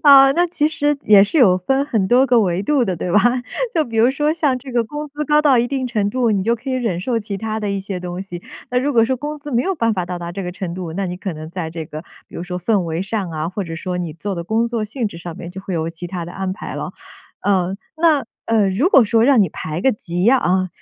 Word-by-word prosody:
呃， 275 -2 +8
那 350 +4 +2
其 320 -3 +1
实 295 -2 0
也 205 -2 +7
是 205 +10 0
有 190 -9 +6
分 270 +9 +1
很 215 -9 0
多 255 +4 +5
个 245 -3 +4
维 185 -1 0
度 270 +2 +2
的 185 -4 -2
对 175 +1 -3
吧？ 210 - +6 0.6
就 315 -3 +2
比 230 -1 -6
如 235 +3 +5
说 295 +3 +1
像 295 -6 +1
这 260 +1 -10
个 240 -1 +2
工 295 +5 -6
资 295 +1 -4
高 300 +1 +3
到 275 -5 +5
一 235 - +2
定 265 0 -2
程 215 -5 0
度， 240 +1 +1
你 200 -3 +1
就 230 +4 +1
可 265 +4 -6
以 - - -1
忍 230 -9 -1
受 230 +6 -1
其 205 -2 -5
他 220 +2 -3
的 210 -1 -2
一 200 - -1
些 190 -1 -5
东 180 0 -5
西， 175 -3 -8 0.3
那 250 - +2
如 285 +3 0
果 230 -3 +5
说 260 +3 0
工 295 +4 -5
资 290 0 -8
没 240 +1 +2
有 385 - -1
办 230 -8 +1
法 185 -4 -2
到 180 0 -4
达 170 0 -6
这 195 +2 -5
个 180 - -4
程 180 -1 -5
度， 180 -3 -5
那 195 +2 -2
你 180 - -4
可 190 0 -4
能 155 +1 -8
在 175 -2 -4
这 160 0 -6
个， 155 0 -8 0.2
比 - - -18
如 - - -4
说 180 0 -4
氛 200 +3 +1
围 165 0 -2
上 195 -2 -3
啊， 155 0 -3
或 195 +3 -4
者 165 -1 -6
说 180 +1 -3
你 170 -3 -3
做 195 +4 -4
的 170 - -4
工 220 +5 +1
作 230 -2 -2
性 225 +2 -3
质 170 -5 -7
上 170 -1 -7
面 170 - -7
就 190 +2 -8
会 190 -1 -5
有 160 -1 -1
其 170 +1 -7
他 175 -1 -5
的 175 - -9
安 190 0 -3
排 190 - -7
了。 - - -4 0.6
嗯， 190 -1 +1 0.2
那， 315 -3 +3 0.2
呃， 220 -3 +3
如 215 - +2
果 270 - +7
说 225 +2 +3
让 265 -3 +5
你 190 - +3
排 155 +1 -5
个 265 - +3
级 180 0 -1
啊， 185 -8 +2
205 Hz, 310 characters per minute, -19 LUFS, 180-255 Hz, 0.6 s, 呃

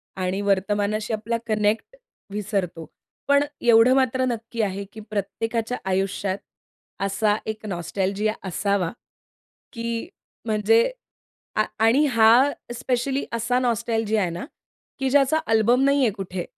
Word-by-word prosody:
आणि 185 +1 -2
वर्तमानाशी 205 +2 0
आपला 220 +2 -1
कनेक्ट 215 - 0 0.4
विसरतो. 195 -5 -3 0.4
पण 280 0 +5 0.2
एवढं 235 +1 +6
मात्र 260 -1 +2
नक्की 230 -1 -3
आहे 200 -1 -2
की 220 - -9
प्रत्येकाच्या 225 +3 -2
आयुष्यात 190 0 -1 0.7
असा 205 +1 +1
एक 220 0 -5
नॉस्टॅल्जिया 195 +3 -1
असावा 190 -1 0 0.8
की 230 +3 -4 0.4
म्हणजे 220 - +3 0.7
आ 215 - +3 0.2
आणि 250 +7 +5
हा 240 +2 +5 0.2
स्पेशली 260 +3 -1
असा 235 +2 0
नॉस्टॅल्जिया 225 -3 0
आहे 180 - 0
ना 170 +2 -5 0.5
की 270 -1 0
ज्याचा 280 +2 +4
अल्बम 225 +3 +3
नाही 280 +1 +3
आहे 230 - +3
कुठे. 190 -3 -5
220 Hz, 120 wpm, -24 LUFS, 200-240 Hz, 0.8 s, एवढं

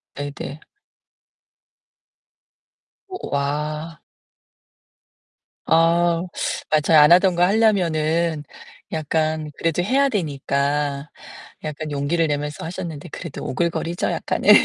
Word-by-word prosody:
네네. 145 +1 -6 2.5
오 375 -1 -7
와. 150 +3 -2 1.6
아 170 +1 +3 0.5
맞아요. 155 +1 +5
안 150 - +6
하던 180 +1 +6
거 175 - +3
하려면은 170 -6 +2 0.5
약간 155 0 -1
그래도 165 +1 0
해야 275 +7 +3
되니까 145 - -1 0.5
약간 155 0 -5
용기를 150 +4 0
내면서 150 +1 -3
하셨는데 165 -2 -6
그래도 170 -2 -7
오글거리죠, 170 +3 -1
약간은. - - -1
160 Hz, 200 characters per minute, -22 LUFS, 150-170 Hz, 2.5 s, 안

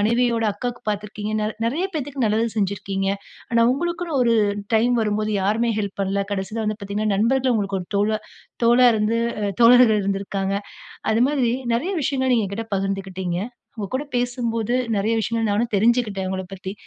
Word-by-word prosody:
மனைவியோட 235 +1 +2
அக்காக்கு 245 +4 -5
பாத்துருக்கீங்கனால் 210 +1 -3
நெறைய 305 +11 0
பேத்துக்கு 280 -4 -2
நல்லது 220 +2 +1
செஞ்சிருக்கீங்க. 195 -1 -1 0.4
ஆனா 230 0 +3
உங்களுக்குன்னு 340 0 -2
ஒரு 235 -1 +3 0.4
டைம் 240 +3 +3
வரும்போது 215 0 0
யாருமே 220 +4 +1
ஹெல்ப் 200 -1 -5
பண்ல. 195 0 -1 0.2
கடைசில 200 +3 -3
வந்து 215 0 -2
பாத்தீங்கன்னா, 200 +1 -3
நண்பர்கள் 255 +5 +2
உங்களுக்கு 200 -3 -1
ஒரு 180 - -8
தோழ 200 +1 +2 0.5
தோளா 240 +2 +6
இருந்து 220 +1 +1 0.2
அ 205 - 0
தோழர்கள் 235 -2 +7
இருந்திருக்காங்க. 195 0 -2 0.6
அது 220 +1 +2
மாதிரி 270 -5 +1 0.2
நெறைய 300 +12 0
விஷயங்கள் 260 -1 0
நீங்க 225 -4 +2
என்கிட்ட 215 +4 -5
பகிர்ந்துக்கிட்டீங்க. 190 -2 -2 0.4
உங்க 205 -2 -3
கூட 285 +3 -2
பேசும்போது 240 -2 -1 0.2
நெறைய 220 +3 +1
விஷயங்கள் 225 -1 -1
நானும் 225 +2 0
தெரிஞ்சுக்கிட்டேன், 210 -3 +1
உங்கள 190 0 -3
பத்தி. 190 +1 -6
220 Hz, 155 wpm, -22 LUFS, 200-240 Hz, 0.6 s, தோழர்கள்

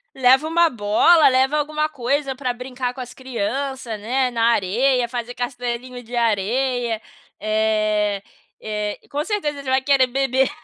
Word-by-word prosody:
leva 265 +3 +4
uma 335 +1 +3
bola, 250 +8 +4
leva 265 +3 +2
alguma 305 +1 0
coisa 275 0 -1
pra 255 -2 -2
brincar 250 0 -4
com 260 - -7
as 245 -1 -8
criança, 260 0 -3
né, 250 +4 0
na 230 -1 -1
areia, 240 +5 +2
fazer 240 0 -5
castelinho 245 0 -4
de 240 +2 -8
areia, 235 +1 0 0.4
eh 215 -1 +1 0.4
eh, 210 -1 -3
com 290 +1 -2
certeza 305 -8 -2
você 260 - -5
vai 265 0 +3
querer 270 -2 +3
beber. 265 +1 +1
250 Hz, 145 wpm, -21 LUFS, 230-270 Hz, 0.4 s, leva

